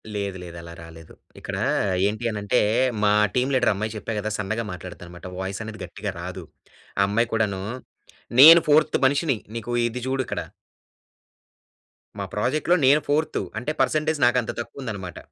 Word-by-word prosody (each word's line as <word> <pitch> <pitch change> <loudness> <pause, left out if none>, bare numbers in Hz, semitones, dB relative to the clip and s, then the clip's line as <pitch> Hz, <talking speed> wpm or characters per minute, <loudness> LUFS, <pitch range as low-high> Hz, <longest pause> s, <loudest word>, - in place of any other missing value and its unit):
లేదు, 100 -2 -3
లేదు 85 -1 -9
అలా 85 0 -10
రాలేదు. 80 -1 -13 0.3
ఇక్కడా - - -4 0.4
ఏంటి 110 +3 -3
అనంటే, 105 -1 0 0.4
మా 105 - +4 0.2
టీమ్ 125 +2 +1
లీడరమ్మాయి 110 -3 +1
చెప్పా 110 +1 -4
గదా! 110 +1 -3
సన్నగా 110 +3 -2
మాట్లాడుతానమాట. 90 -1 -10
వాయిసనేది 100 +2 -5
గట్టిగా 100 -1 -6
రాదు. 90 0 -6 0.6
అమ్మాయి 115 +4 +1
కూడానూ 105 -4 0 0.8
నేను 165 +4 +11
ఫోర్త్ 150 +1 +4
మనిషిని, 140 -1 +2 0.2
నీకూ 115 +1 -5 0.2
ఇది 120 +2 -5
జూడిక్కడ. 130 -2 -2 1.8
మా - - -2
ప్రాజెక్ట్‌లో 150 +11 +1
నేను 145 +3 +5
ఫోర్తు. 155 -4 0 0.2
అంటే, 135 +6 -3
పర్సంటేజ్ 155 0 +1
నాకంత 120 -1 +2
తక్కువుందనమాట. 110 -8 -6
110 Hz, 130 wpm, -24 LUFS, 100-130 Hz, 1.8 s, నేను